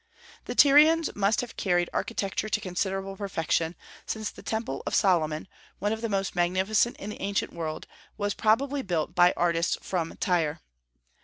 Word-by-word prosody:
The - - -5
Tyrians 305 +3 +6
must 205 +2 +2
have 245 - -8
carried 175 -2 +1
architecture 200 +2 -2
to 210 - +1
considerable 195 0 -3
perfection, 170 -4 -1 0.3
since 220 -1 -3
the - - -13
Temple 220 - -3
of - - 0
Solomon, 160 -5 +2 0.3
one 205 +3 0
of 220 - -5
the 230 - -2
most 195 -2 -1
magnificent 190 +6 +1
in 205 - -6
the - - -9
ancient 200 0 -1
world, 160 -2 -4 0.3
was 205 -1 -1
probably 270 +6 +1
built 170 -6 -2
by 180 0 +5
artists 170 -1 +1
from 170 -3 -3
Tyre. 165 -4 0
195 Hz, 160 wpm, -27 LUFS, 175-215 Hz, 0.3 s, Tyrians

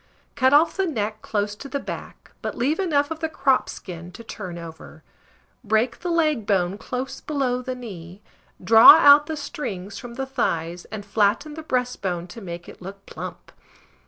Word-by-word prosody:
Cut 260 -2 +3
off 300 +4 +5
the 385 -1 +1
neck 215 -7 -3
close 205 -1 -2
to 275 +7 -10
the 280 - -2
back, - - -8
but - - -4
leave 285 +8 0
enough 295 -5 +1
of 320 - -4
the 320 0 -2
crop 270 -4 +1
skin 175 -1 -8
to 230 - -10
turn 185 -6 -7
over; 160 -1 -11 0.6
break 220 +2 +1
the 355 - -4
leg 305 -10 +1
bone 190 -1 +1
close 260 +3 -5
below 265 -4 -1
the 255 0 -4
knee, 190 -7 -9 0.4
draw 225 0 +10
out 290 -1 +7
the 315 - -4
strings 205 -9 -6
from 240 -1 -9
the 270 +1 -3
thighs, 175 -10 -2
and 210 -1 -8
flatten 210 +8 +1
the 320 - -7
breastbone 250 - -2
to 200 +6 -10
make 175 -2 -7
it - - -13
look 195 +2 -10
plump. - - -9
230 Hz, 180 wpm, -23 LUFS, 195-285 Hz, 0.6 s, draw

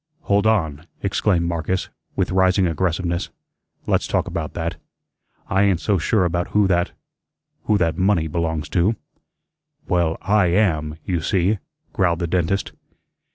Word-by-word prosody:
"Hold 100 +1 +2
on," 85 -7 0 0.2
exclaimed 95 -3 +1
Marcus, 85 +2 -2 0.3
with - - 0
rising 95 0 +3
aggressiveness. 85 +1 -1 0.6
"Let's - - +1
talk - - 0
about 80 -2 -4
that. 85 0 -3 0.7
I 95 - +2
ain't 100 -4 +3
so 100 +1 +1
sure 95 +4 +2
about 85 0 -1
who 105 -1 +2
that 90 -1 +1 0.7
who 105 - +3
that 85 -1 0
money 95 -4 +3
belongs 80 -1 -2
to." 90 +8 +2 0.9
"Well, 85 -3 +1
I 100 -1 +3
AM, 80 -5 +1
you 90 -3 -1
see," 95 +5 +1 0.3
growled 90 -3 +2
the 85 - -2
dentist. 90 +3 0
90 Hz, 140 wpm, -22 LUFS, 85-95 Hz, 0.9 s, rising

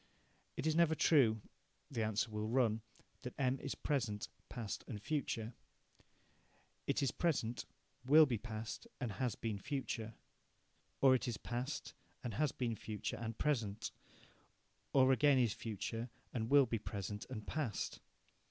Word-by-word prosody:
It 135 - -2
is 160 -1 +3
never 165 -1 +5
true, 120 -10 +5 0.5
the 120 -4 -1
answer 110 0 +1
will 105 0 -2
run, 115 -2 +2 0.4
that 125 - -6
M 130 -1 +2
is - - -3
present, 120 -8 -1 0.2
past 115 -5 -4
and 105 - -5
future. 115 -2 -2 1.3
It 145 - +2
is 135 - +2
present, 130 -9 0 0.4
will 150 +5 +8
be 120 -6 -1
past, 110 - -5
and 125 -6 -2
has 115 +3 -1
been 110 -3 -3
future. 115 -3 -3 0.9
Or 135 -1 +8
it 130 - +1
is 120 -4 -1
past, 130 +7 -3 0.3
and 120 -3 -3
has 145 +6 +2
been 120 -3 -1
future 105 -1 -4
and 115 0 -4
present, 115 -7 0 1.0
or 130 -1 +6
again 140 +1 +5
is 120 -5 +3
future 115 +2 -4 0.2
and 115 -2 -1
will 140 -1 +7
be 115 -2 -1
present 100 0 -4
and 110 -5 -5
past. 140 -10 -2
120 Hz, 145 wpm, -37 LUFS, 110-135 Hz, 1.3 s, will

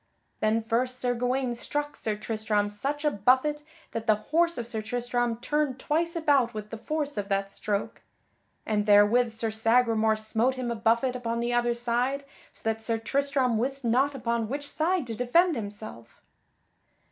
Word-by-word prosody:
Then 220 +1 +1
first 250 +3 0
Sir 245 -1 +1
Gawaine 250 +1 0
struck 290 +4 -3
Sir 215 -1 -2
Tristram 210 -1 -1
such 280 +8 -3
a 300 - +4
buffet 260 +7 +2 0.3
that 225 0 -5
the 215 - +5
horse 335 +10 +1
of 235 - -3
Sir 225 -1 -3
Tristram 240 +1 -1
turned 285 +2 -1
twice 335 +6 -1
about 280 -8 +2
with 210 0 -6
the 225 - -5
force 295 -2 -2
of 200 0 -4
that 195 0 0
stroke; 210 +2 -3 0.6
and 210 -1 0
therewith 210 +4 +5
Sir 225 0 -2
Sagramore 225 0 +3
smote 220 +4 0
him 250 -2 -3
a - - -1
buffet 230 +3 +1
upon 235 -2 -2
the 240 +1 -1
other 240 0 +2
side 245 +4 -1 0.3
so - - -15
that 225 0 0
Sir 225 0 -1
Tristram 265 0 0
wist 270 +2 -2
not 265 +5 +2
upon 235 -3 -1
which 285 +2 -3
side 335 +1 0
to 230 - -5
defend 310 +9 +3
himself. 205 - -8
240 Hz, 170 wpm, -27 LUFS, 220-270 Hz, 0.6 s, the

